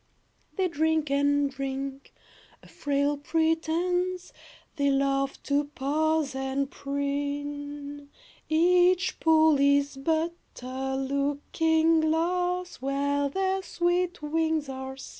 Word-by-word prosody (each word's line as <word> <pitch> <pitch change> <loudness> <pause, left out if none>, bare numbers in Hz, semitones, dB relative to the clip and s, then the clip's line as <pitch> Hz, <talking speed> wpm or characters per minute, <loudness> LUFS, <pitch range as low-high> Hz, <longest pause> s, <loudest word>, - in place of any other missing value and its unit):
They 380 -1 +1
drink 315 -2 0
and 285 0 +2
drink. 275 0 -5 0.5
A - - -15
frail 285 0 -1
pretense! 330 +4 0 0.4
They 280 -1 +2
love 275 0 +1
to 285 +1 +1
pose 295 +1 0
and 265 +1 -2
preen. 285 +1 -4 0.4
Each 360 +3 +3
pool 315 -2 +4
is 280 0 +3
but 320 +4 0 0.3
a 265 +1 -3
looking 290 +4 +1
glass, 355 +3 0
Where 280 +2 0
their 385 +4 0
sweet 350 -2 -1
wings 315 -1 0
are 265 0 -6
seen. - - -9
290 Hz, 105 wpm, -27 LUFS, 280-325 Hz, 0.5 s, pool